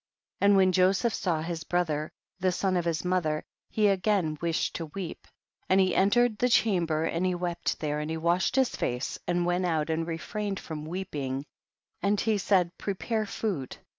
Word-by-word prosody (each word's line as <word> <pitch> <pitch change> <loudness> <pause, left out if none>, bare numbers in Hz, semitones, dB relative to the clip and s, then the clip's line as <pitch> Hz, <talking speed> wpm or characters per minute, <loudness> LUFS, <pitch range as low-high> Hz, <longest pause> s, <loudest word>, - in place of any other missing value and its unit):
10. 200 - +4
And - - +5
when 190 -1 +5
Joseph 190 +5 +3
saw 165 -4 -1
his 165 -1 -4
brother, 160 -4 -1 0.3
the 185 0 +2
son 185 +1 0
of 175 -1 0
his 165 0 -1
mother, 170 -4 0 0.3
he 215 -1 +2
again 195 -5 +1
wished 170 -1 0
to 165 - -5
weep, 185 -4 -6 0.4
and 190 - +5
he 185 -2 +3
enter 220 +6 +4
ed 220 -4 -3
the 250 - +3
chamber, 170 -9 +2
and 165 +2 -1
he 185 -1 +1
wept 175 -1 -2
there, 150 -1 -1
and 150 +1 -3
he 160 - -2
washed 170 +7 +1
his 265 -2 +2
face, 125 +2 -2
and 175 0 +1
went 175 +1 +1
out 160 -2 0
and 165 +1 -1
refrained 195 +4 -3
//"om 155 -2 -7
weeping, 145 -6 -4 0.6
and 200 0 +2
he 220 -2 +1
said, 180 -3 +2
prepare 215 +2 -2
food. 185 - -3
180 Hz, 190 wpm, -28 LUFS, 160-195 Hz, 0.6 s, And